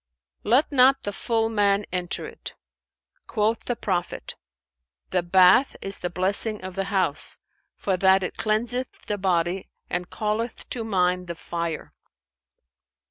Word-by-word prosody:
"Let 255 +9 +3
not 270 0 +5
the 205 - -3
full 225 +2 0
man 205 -2 +2
enter 180 0 -2
it. - - -9 0.7
Quoth 220 +1 0
the 245 - -1
Prophet, 180 -6 -3 0.8
'The 180 - +2
bath 185 +8 +5
is 195 0 -5
the 180 - -3
blessing 200 +4 +2
of 185 0 -6
the 195 +1 -2
house, 190 -8 +1 0.4
for 190 -2 -1
that 190 +1 +4
it - - -4
cleanseth 240 +4 0 0.2
the 205 -1 -2
body 180 -1 0 0.2
and 180 0 -2
calleth 220 +2 -3
to 235 - -2
mind 180 -4 0
the 170 - -5
Fire.'" 170 -1 -4
195 Hz, 135 wpm, -25 LUFS, 180-225 Hz, 0.8 s, not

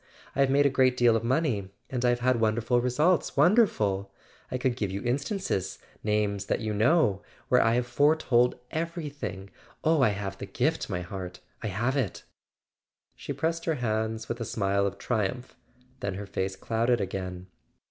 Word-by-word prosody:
I - - -4
have 135 -1 +4
made 140 +1 +4
a - - +6
great 130 -1 +3
deal 120 -2 +5
of 115 - 0
money; 120 - 0 0.2
and 125 -2 -2
I 125 - +4
have 120 0 +1
had 125 -1 +2
wonderful 115 +2 +2
results—wonderful! 140 - +2 0.4
I 125 - -2
could 125 -1 0
give 105 -5 -2
you 95 +1 -3
in¬ 125 +3 +1
stances—names 105 - -2
that - - 0
you 110 -2 -2
know—where 110 - +2
I 115 +1 +3
have 125 0 +1
fore¬ 145 +6 +3
told 125 -4 +3 0.2
everything! 145 - -4 0.3
Oh, 160 -2 +3
I 130 - +5
have 100 -1 -4
the - - -6
gift, - - -1
my 90 - -2
heart, 90 0 -7 0.2
I 110 - -3
have 115 +7 -1
it!" 125 -9 -2 0.9
She - - -7
pressed 165 +4 -1
his 160 -2 0
hands 110 -1 -2
with 115 +1 -4
a - - 0
smile 100 -2 0
of 100 0 -5
triumph; 110 +6 -2 0.4
then 100 -2 -3
her 100 +1 -5
face 95 0 -3
clouded 115 +4 +1
again. 95 -2 -4
120 Hz, 175 wpm, -28 LUFS, 100-135 Hz, 0.9 s, a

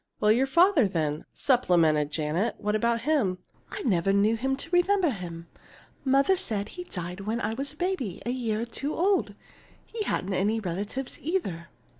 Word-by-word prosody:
"Well, 210 - +4
your 255 +5 +3
father, 335 - +5
then?" 155 -5 -2
supplemented 165 - +3
Janet. 155 +7 -1
"What 210 +1 -1
about 235 +1 +1
him?" 240 -10 +1 0.3
"I 405 - -6
never 195 -5 +2
knew 205 +3 +3
him 265 +4 -1
to 305 - -6
remember 355 -1 +3
him. 170 -5 -7 0.6
Mother 275 +7 +3
said 210 - -2
he 360 0 -8
died 180 - -6
when 215 +4 -2
I 220 - -1
was 275 +4 -4
a - - -21
baby 350 - -2
a 240 - 0
year 230 -4 -1
or - - -1
two 275 +6 -3
old. 385 +3 +1 0.5
He 455 - -6
hadn't 200 - -1
any 210 +4 +1
relatives, 205 +7 -4
either." 200 - -2
225 Hz, 175 wpm, -27 LUFS, 185-280 Hz, 0.6 s, father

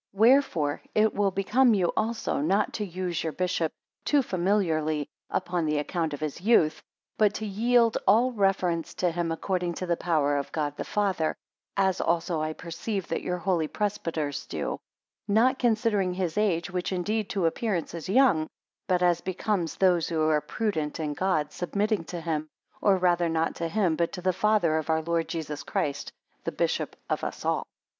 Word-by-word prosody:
6 195 - -15
Wherefore 220 - +4
it 215 0 +4
will 205 -1 +2
become 215 +6 +3
you 180 -3 +2
also 225 +1 -1
not 190 +8 +1
to 210 - -2
use 180 -3 -3
your 160 -2 -2
bishop 180 -3 0 0.3
too 290 -2 +3
familiarly 165 - 0 0.2
upon 175 -3 -1
the 150 0 +1
account 155 +1 -1
of - - -12
his 155 0 -4
youth; 190 -7 +3 0.4
but 210 -2 +4
to 220 - -3
yield 230 +3 +3
all 235 +6 +5
reverence 190 -6 0
to 180 -2 +1
him 170 0 -2
according 175 +1 -1
to 185 - -4
the 175 -1 +1
power 150 -5 +1
of 140 - -4
God 145 -2 -2
the - - -4
Father; 195 -6 0 0.4
as 190 -1 +2
also 165 -1 0
I 155 0 -1
perceive 180 +4 -4
that 165 - -1
your 180 - -2
holy 175 -3 0
presbyters 165 -8 -2
do: - - -3 0.5
not 230 +6 +3
considering 215 -6 +1
his 180 -4 -2
age, 180 -5 +1
which 180 +1 -2
indeed 205 +3 -1
to 190 -4 0
appearance 180 +1 -1
is 170 0 -6
young; 195 -9 +4 0.4
but 180 -1 +2
as 175 -1 +3
becomes 185 -2 -1
those 180 -3 +3
who 155 -2 +1
are 150 -1 +3
prudent 155 -2 -2
in 150 -2 -2
God, 150 -3 0
submitting 200 +2 -1
to 175 0 -6
him, 155 -2 -2 0.3
or 200 -2 +4
rather 175 -2 +2
not 165 0 0
to 170 - -1
him 180 -2 +1
but 170 +1 0
to 180 - -5
the 185 0 +2
Father 190 -5 +2
of 155 - -6
our 160 0 +2
Lord 165 0 0
Jesus 155 -4 -4
Christ, 140 -2 -2 0.3
the - - -2
bishop - - -1
of - - -2
us - - -5
all. - - 0
180 Hz, 180 wpm, -27 LUFS, 160-205 Hz, 0.5 s, all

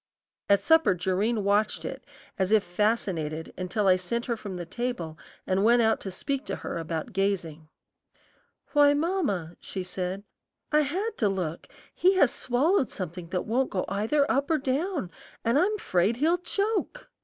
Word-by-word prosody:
At 200 0 +5
supper 320 - +4
Jerrine 195 +5 0
watched 205 +2 +1
it - - -6 0.4
as 190 +1 +1
if 215 -2 +5
fascinated 175 -6 -1
until 185 +3 -2
I 185 -1 +6
sent 235 +6 -3
her 235 - -1
from 205 -4 -7
the 175 -1 -5
table 190 -4 -4 0.3
and 190 +1 +1
went 235 +2 +5
out 220 0 +3
to 195 - -6
speak 275 +9 -3
to - - -2
her - - -5
about 165 +7 -4
gazing. 175 -6 -1 1.1
"Why, 290 -1 +6
mamma," 290 - -1
she 190 - -5
said, 185 +1 -4 0.5
"I 300 0 +5
had 385 +10 -2
to 210 - +3
look; 175 -4 -3 0.3
he 375 +2 +3
has 285 -9 +4
swallowed 270 +6 +1
something 175 -2 -6
that 180 +1 -2
won't 255 +4 +1
go 185 -3 -2
either 225 +9 +1
up 275 0 +1
or 320 - +3
down, 280 - -1 0.3
and 235 +5 +3
I'm 425 +5 +2
'fraid 190 - +1
he'll 330 +6 +2
choke." 420 +7 -2
215 Hz, 165 wpm, -27 LUFS, 185-285 Hz, 1.1 s, I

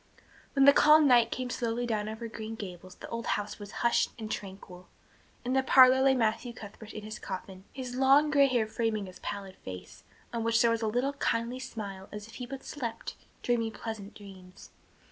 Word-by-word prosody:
When 275 -1 +5
the 280 - +9
calm 305 +1 +6
night 240 -3 +5
came 255 0 -4
softly 235 0 -2
down 215 -2 -1
over 220 +2 -6
Green 220 0 -7
Gables 185 -3 -9
the - - -10
old 230 0 -4
house 205 +1 -6
was 205 -1 -8 0.2
hushed 235 - +3
and 220 -2 -6
tranquil. 190 -2 -8 0.6
In 250 - 0
the 265 - +4
parlor 260 0 +7
lay 265 0 +5
Matthew 230 0 0
Cuthbert 215 0 -11
in 215 - -7
his 215 +1 -7
coffin, 190 0 -7
his 255 -2 -6
long 275 +3 +5
gray 280 -2 +5
hair 245 -4 +1
framing 220 -1 -2
his 185 -1 -12
placid 195 -2 -6
face 90 -1 -10 0.3
on 230 -1 -2
which 230 0 +2
there 235 -1 +4
was 230 0 0
a 220 - 0
little 245 +6 0
kindly 240 -2 -1
smile 200 -7 -7
as 210 0 -7
if 230 - -15
he 245 - -5
but 270 +1 -7
slept, 235 -6 -5 0.3
dreaming 230 -2 0
pleasant 210 -1 -7
dreams. 190 -2 -13
225 Hz, 200 wpm, -30 LUFS, 205-255 Hz, 0.6 s, the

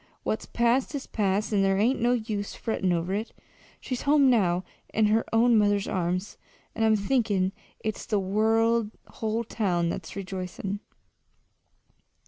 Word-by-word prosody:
what's 215 - -2
past 240 +5 +1
is 275 - -4
past, 205 0 0
and 200 -1 +3
there 195 0 +2
ain't 235 +5 +2
no 240 +1 +3
use 215 -4 -3
frettin' 195 -5 -1
over 175 +2 -1
it. 215 +3 -3 0.5
She's 255 -2 -4
home 285 -2 +4
now, 185 -6 +2 0.3
in 220 - +2
her 220 +2 +3
own 230 +1 +4
mother's 205 -1 +2
arms, 180 +1 -2 0.4
and 225 - -1
I'm 220 -1 +5
thinkin' 205 -4 +1 0.3
it's 215 -1 -4
the 210 -3 +1
whole 220 +2 0
town 180 -7 0
that's - - -5
rejoicin'!" 190 +1 -5
215 Hz, 140 wpm, -27 LUFS, 195-230 Hz, 0.5 s, I'm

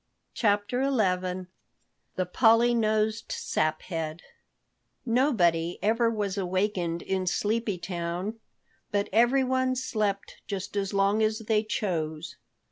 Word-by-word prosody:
CHAPTER 210 +4 +1
XI 185 -8 0 0.7
THE 185 - 0
POLLY 230 +5 +4
NOSED 220 -1 0
SAPHEAD 155 +1 -2 0.8
NOBODY 180 - +2
ever 230 +2 +3
was 205 -3 -2
awakened 185 -2 -1
in 190 -1 -2
Sleepy 210 +1 0
Town, 175 +4 -4 0.5
but 205 0 -1
everyone 260 +2 +3
slept 210 -6 -2
just 200 0 -5
as 195 -1 -1
long 200 +2 +2
as 215 0 +2
they 215 -1 +2
chose. 160 -8 -3
205 Hz, 105 wpm, -27 LUFS, 180-225 Hz, 0.8 s, POLLY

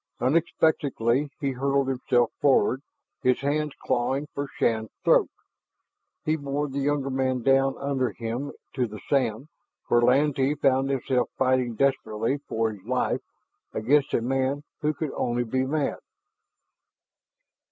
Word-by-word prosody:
Unexpectedly, 145 -3 +1
he 140 -2 0
hurled 135 +1 0
himself 125 -2 +1
forward, 130 -2 +3 0.4
his 125 0 +2
hands 150 +1 0
clawing 135 +4 0
for 140 0 -3
Shann's 110 -1 0
throat. - - +4 1.0
He 155 - +2
bore 140 0 -2
the 140 0 -4
younger 140 -1 0
man 130 -2 0
down 135 +1 +3
under 135 -2 0
him 120 +5 -4 0.2
to 125 -2 0
the 105 -1 -9
sand 130 -2 +1 0.4
where 120 - +4
Lantee 135 +3 +3
found 135 -1 +2
himself 130 -2 0
fighting 130 -2 +1
desperately 130 -1 0
for 110 0 0
his 105 -3 -11
life 125 +4 0 0.5
against 135 +6 +2
a 115 - +1
man 135 +3 0 0.2
who 150 - +1
could 155 -2 -3
only 120 0 -1
be 130 +3 -1
mad. 150 0 -1
135 Hz, 130 wpm, -26 LUFS, 120-140 Hz, 1.0 s, throat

